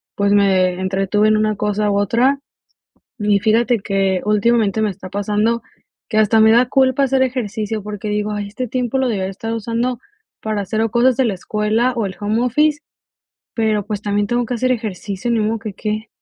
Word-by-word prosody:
pues, 200 0 +1
me 185 -3 +3
entretuve 195 +3 +1
en 215 0 +3
una 215 0 +1
cosa 210 0 -1
u 200 - +1
otra. 245 +7 +2 0.8
Y 205 -1 +2
fíjate 230 +3 +2
que, 195 -2 0
últimamente, 215 0 +2
me 210 - +1
está 185 0 -9
pasando 210 +3 0 0.5
que 215 - 0
hasta 220 +1 +4
me 220 0 +6
da 240 +2 +5
culpa 265 0 +2
hacer 265 0 +2
ejercicio, 220 -4 -2
porque 210 0 -5
digo: 210 0 -1
"Ay, 205 -1 -3
este 250 +5 -4
tiempo 250 +1 -2
lo 265 - +1
debí 205 -4 -1
haber 190 +1 -2
estado 225 +4 -4
usando 230 +2 -2 0.4
para 215 -1 -2
hacer 215 +3 -2
o 225 - 0
cosas 240 +1 +3
de 265 - +2
la 215 -4 0
escuela 215 +6 0
o 225 - 0
el 190 - -7
home 215 +3 0
office, 295 +4 +2 0.7
pero, 215 -3 0
pues, 210 -1 -4
también 205 0 0
tengo 240 +2 0
que 245 - -3
hacer 255 +2 +1
ejercicio, 215 -1 -4
ni 230 -2 +2
modo 220 +1 0
que 210 -1 -6
qué?". 215 +1 -4
215 Hz, 200 wpm, -19 LUFS, 205-235 Hz, 0.8 s, me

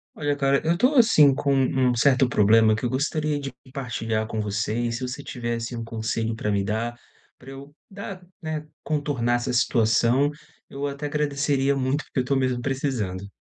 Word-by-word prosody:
Olha, 145 -1 -1
cara, 140 -1 +2
eu 165 +2 +3
tô 255 +8 +3
assim 190 - +6
com 140 +1 0
um 130 -2 +2
certo 130 +1 +4
problema 110 0 +4
que 110 - -6
eu 120 - +1
gostaria 150 +3 -1
de 135 -2 -6 0.2
partilhar 115 -5 -2
com 110 -1 -3
você, 105 +1 -2
e 120 0 -1
se 115 +2 -4
você 140 +3 -6
tivesse 120 -1 -4
um 115 - -4
conselho 115 0 -2
pra 105 -1 -2
me 100 -1 +1
dar 115 +4 -2 0.4
pra 135 +1 -12
eu 140 +2 -11
dar, 195 -2 -8 0.2
né, 155 -2 -4 0.2
contornar 145 -6 0
essa 120 +1 -2
situação, 120 +3 +3 0.4
eu 140 +1 -4
até 140 +1 -5
agradeceria 145 -2 0
muito, 135 +3 -1
porque - - -3
eu - - -5
tô 140 - +1
mesmo 130 -2 0
precisando. 120 -8 -2
130 Hz, 185 wpm, -24 LUFS, 115-145 Hz, 0.4 s, assim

